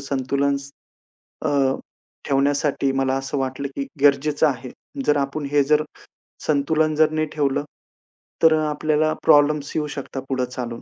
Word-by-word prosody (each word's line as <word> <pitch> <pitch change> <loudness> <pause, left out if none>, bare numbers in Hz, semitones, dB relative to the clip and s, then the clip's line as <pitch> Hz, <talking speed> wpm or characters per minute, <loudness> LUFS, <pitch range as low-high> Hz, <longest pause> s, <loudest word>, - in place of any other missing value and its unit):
संतुलन 140 +1 0 0.9
अ, - - +2 0.8
ठेवण्यासाठी 140 0 +1
मला 135 0 0
असं 135 +1 -4
वाटलं, 135 +1 -2
की 275 - -3 0.2
गरजेचं 145 +2 +3
आहे. 130 -2 -3 0.4
जर 150 - +3
आपण 140 +1 -2
हे 145 -1 +4
जर 150 +2 +3 0.6
संतुलन 155 +1 +1
जर 155 0 +4
नाही 155 0 0
ठेवलं, 145 -2 0 0.8
तर 160 -1 +7
आपल्याला 155 0 +1
प्रॉब्लेम्स 145 0 +4
येऊ 150 -1 0
शकतात 135 -1 -5
पुढे 130 -2 0
चालून. 120 -2 -6
140 Hz, 135 wpm, -22 LUFS, 135-150 Hz, 0.9 s, तर